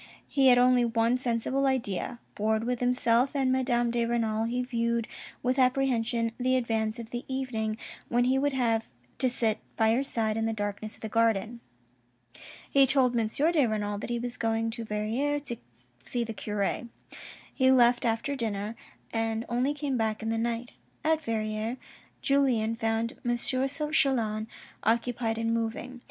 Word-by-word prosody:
He 270 -2 +3
had 250 -1 +7
only 250 0 +5
one 230 +1 +2
sensible 255 +3 0
idea. 240 -5 -1 0.2
Bored 220 +1 0
with 245 0 -1
himself 250 +1 +2
and 265 -2 +2
Madame 245 -2 +1
de 235 0 +1
Renal, 225 -2 0
he 245 +2 -1
viewed 235 -2 -1 0.4
with 255 +2 +1
apprehension 245 -3 +2
the 255 +1 +2
advance 225 -2 0
of 230 -1 -8
the 240 0 -4
evening 235 -5 -2 0.3
when 240 +1 +3
he 260 +2 +2
would 285 0 +1
have 230 -4 +1 0.3
to 255 - +3
sit 225 -3 0 0.2
by 220 -1 +4
her 255 +4 +1
side 225 -5 -1
in 225 0 0
the 225 - -1
darkness 205 0 -4
of - - -23
the 220 - -3
garden. 225 +1 +1 1.1
He 275 -1 +5
told 260 -2 +3
M. 225 -2 +2
de 300 +5 +2
Renal 205 -2 -2
that - - -6
he 240 - 0
was 245 +1 -4
going 225 -1 0
to 230 0 -6
Verrieres 235 +8 -1
to 235 - -3 0.5
see 240 -1 -1
the 225 -1 -5
cure. 210 +2 -2 0.7
He 260 -2 +3
left 245 -1 +5
after 230 +4 0
dinner, 215 -3 -3 0.4
and 225 0 -1
only 250 +5 +1
came 285 -3 -1
back 220 -1 -1
in 225 - -1
the 225 - 0
night. 235 +1 -2 0.3
At 315 0 +2
Verrieres 220 0 -2 0.5
Julien 250 -5 +2
found 225 0 -1
M. 240 0 +1
Chelan 260 -4 0 0.4
occupied 230 0 0
in 230 0 0
moving. 230 +2 -3
235 Hz, 165 wpm, -28 LUFS, 225-255 Hz, 1.1 s, had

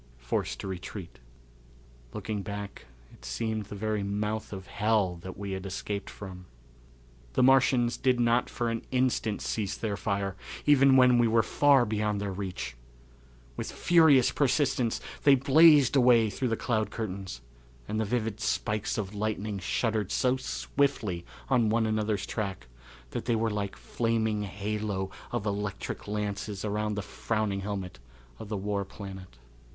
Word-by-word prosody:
Forced - - -2
to - - -5
Retreat. 95 0 -7 0.9
Looking 105 -2 -4
back 100 -6 -7 0.3
it - - -18
seemed 110 -2 -2
the 105 - -8
very 110 0 -1
mouth 105 +2 -2
of 95 -2 -7
hell 105 -3 +1
that 95 +2 -9
we 100 0 -5
had 95 0 -4
escaped 100 +1 -4
from. 90 -3 -9 0.9
The - - +3
Martians 125 -2 +4
did 130 -2 +2
not 120 +1 +2
for 120 -1 -1
an 115 - -2
instant 125 -4 0
cease 100 -3 -2
their 105 -3 -2
fire, 100 -2 -2 0.3
even 135 -2 +6
when 125 -1 +6
we 120 - +4
were 115 0 +3
far 140 -2 +4
beyond 105 -1 -1
their 100 -1 -2
reach. 90 -10 -5 0.8
With - - -4
furious 160 -7 +5
persistence 130 -4 +1 0.2
they 140 -1 +7
blazed 145 0 +6
away 120 -4 +5
through 130 +6 -2
the 115 -2 0
cloud 110 -4 0
curtains, 95 - -5 0.5
and 110 - -2
the - - +2
vivid 115 -1 -1
spikes 105 0 -1
of 100 -2 -3
lightning 105 -1 -2
shuddered 105 +1 -1
so 130 -1 +2
swiftly 95 - -1 0.2
on 120 -5 +3
one 115 +1 +2
another's 110 -2 0
track 95 - -4 0.5
that - - -4
they 120 -1 +2
were 110 0 0
like 100 -1 -3
a - - -17
flaming 110 -2 0
halo 100 -1 -3 0.2
of 120 -3 -2
electric 100 -1 -3
lances 105 -1 -3
around 105 0 -1
the 105 - -3
frowning 105 +2 -2
helmet 95 -6 -5 0.4
of 105 - -8
the 105 - -2
War 100 0 -1
Planet. 95 - -10
105 Hz, 155 wpm, -29 LUFS, 100-115 Hz, 0.9 s, they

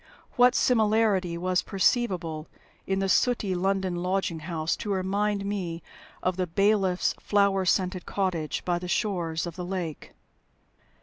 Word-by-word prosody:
What 250 0 +5
similarity 215 -6 +2
was 180 +1 +1
perceivable 180 -7 0 0.4
in 190 - 0
the 195 0 0
sooty 210 -1 +2
London 190 0 0
lodging 180 -2 -1
house 160 0 -2
to 210 - -4
remind 200 +2 0
me 180 -5 -3 0.4
of 185 0 0
the 185 -1 0
bailiff's 195 0 +2
flower 200 -2 +2
scented 185 -1 0
cottage 175 -7 -2
by 175 -1 0
the 180 - -6
shores 175 -4 -1
of 170 -2 -6
the 180 - -4
lake? 175 -4 -5
185 Hz, 135 wpm, -27 LUFS, 175-200 Hz, 0.4 s, What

